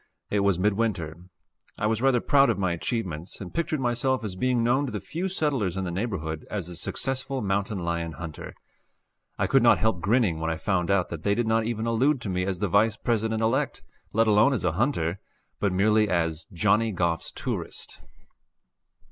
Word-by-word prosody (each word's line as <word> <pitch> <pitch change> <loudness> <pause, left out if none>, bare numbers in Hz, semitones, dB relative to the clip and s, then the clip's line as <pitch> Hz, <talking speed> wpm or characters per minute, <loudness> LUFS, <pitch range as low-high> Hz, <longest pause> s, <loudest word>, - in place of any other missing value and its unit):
It 105 - +2
was 100 -3 +2
midwinter. 100 -5 0 0.6
I - - -1
was 110 +1 +1
rather 135 -2 +4
proud 140 -1 +4
of - - +1
my 95 -3 0
achievements, 85 -2 -4
and 95 -3 -8
pictured 160 -2 -1
myself 125 0 0
as 105 -4 -3
being 125 +4 +1
known 130 +4 +2
to - - -4
the 105 - -3
few 165 - -4
settlers 135 - -1
in 95 - -1
the 90 - -3
neighborhood 85 -6 -3
as 95 -5 -3
a 90 - -7
successful 135 +8 -2
mountain 100 +1 -1
lion 85 -2 -2
hunter. 85 -2 -8 0.8
I - - +1
could 135 - +4
not 120 - +6
help 110 -5 0
grinning 100 -5 +2
when 80 0 -1
I 80 - 0
found 90 +1 0
out 100 -2 +2
that 85 -2 -6
they 100 +3 +1
did 120 +1 0
not 110 0 +2
even 115 -1 -2
allude 125 +5 +2
to 105 - -4
me 90 0 -1
as 95 -1 -2
the 100 +3 -1
Vice 105 +4 +3
President 110 -1 0
elect, 130 +5 0 0.3
let 115 +2 +3
alone 110 +5 +4
as 125 - -2
a - - +2
hunter, 95 - 0 0.4
but 100 - +1
merely 105 +3 +3
as 80 -3 -1
"Johnny 105 +4 +2
Goff's 85 -3 -1
tourist." - - -5
105 Hz, 195 wpm, -26 LUFS, 90-120 Hz, 0.8 s, not